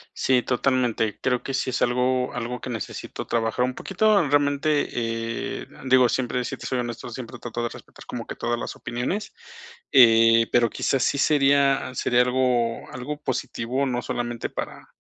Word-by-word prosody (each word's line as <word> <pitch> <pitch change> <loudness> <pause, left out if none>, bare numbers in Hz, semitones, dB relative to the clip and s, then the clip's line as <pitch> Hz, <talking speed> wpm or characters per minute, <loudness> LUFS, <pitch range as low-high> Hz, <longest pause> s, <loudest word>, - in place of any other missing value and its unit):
Sí, 125 -2 +2
totalmente. 125 -4 0
Creo, 125 -1 +1
que 135 - -4
sí 130 0 -1
es 130 - -2
algo 125 +1 +1
algo, 125 +1 -4
que - - -6
necesito 115 -3 -6
trabajar, 115 +1 0
un 130 - -3
poquito. 200 +2 +2
Realmente, 145 +1 +2 0.8
eh, - - -14 0.2
digo, 130 -1 +5
siempre, 125 +1 -1
si - - -4
te - - -8
soy 130 - -1
honesto, 120 -1 -5
siempre 120 +1 -8
trato 120 0 -4
de 120 - -1
respetar, - - -13
como - - -6
que - - -6
todas 120 0 -2
las - - -5
opiniones, 125 - -4 0.6
eh, 115 -3 +6
pero 120 -1 +4
quizás, 135 +3 0
sí - - +1
sería 140 -2 +3
sería 120 -1 +2
algo 125 -2 +1
algo 145 +4 -5
positivo, 130 0 -2
no 125 -1 -1
solamente 120 0 -3
para - - -6
125 Hz, 170 wpm, -24 LUFS, 120-135 Hz, 0.8 s, eh